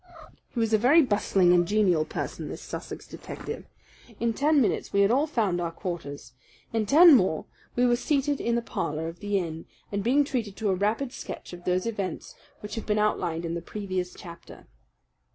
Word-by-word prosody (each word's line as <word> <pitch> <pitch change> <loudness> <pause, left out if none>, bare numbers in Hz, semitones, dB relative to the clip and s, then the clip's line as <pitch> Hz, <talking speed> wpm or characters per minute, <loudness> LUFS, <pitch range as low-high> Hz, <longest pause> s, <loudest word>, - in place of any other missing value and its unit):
He 245 - -5
was 225 -1 +1
a 215 - +5
very 290 +9 +6
bustling 200 -6 +3
and 175 -1 +4
genial 185 -6 +3
person, - - -5
this - - -7
Sussex - - -7
detective. - - -7 0.5
In 230 0 +1
ten 295 +4 +3
minutes 240 - 0
we 200 - +3
had 200 +2 +4
all 280 +5 +3
found 205 - 0
our 170 - -1
quarters. 165 -5 -6 0.4
In 220 -2 0
ten 325 - +8
more 185 -8 +1 0.3
we 245 - +3
were 240 -1 +4
seated 285 +1 0
in 235 0 +1
the 235 - 0
parlour 155 -6 -3
of 165 +1 -8
the 205 -1 0
inn 165 -3 -4 0.2
and 200 -1 -2
being 265 +6 +4
treated 235 -8 -3
to 215 -1 -1
a - - +3
rapid 220 +7 -1
sketch - - -8
of 175 0 -10
those 180 0 +1
events 200 -6 -4 0.3
which 210 - -7
have 225 - -5
been 210 -1 +1
outlined 175 -6 0
in 165 - -3
the 170 - -3
previous 185 -1 -4
chapter. 170 -2 -12
205 Hz, 195 wpm, -27 LUFS, 175-235 Hz, 0.5 s, ten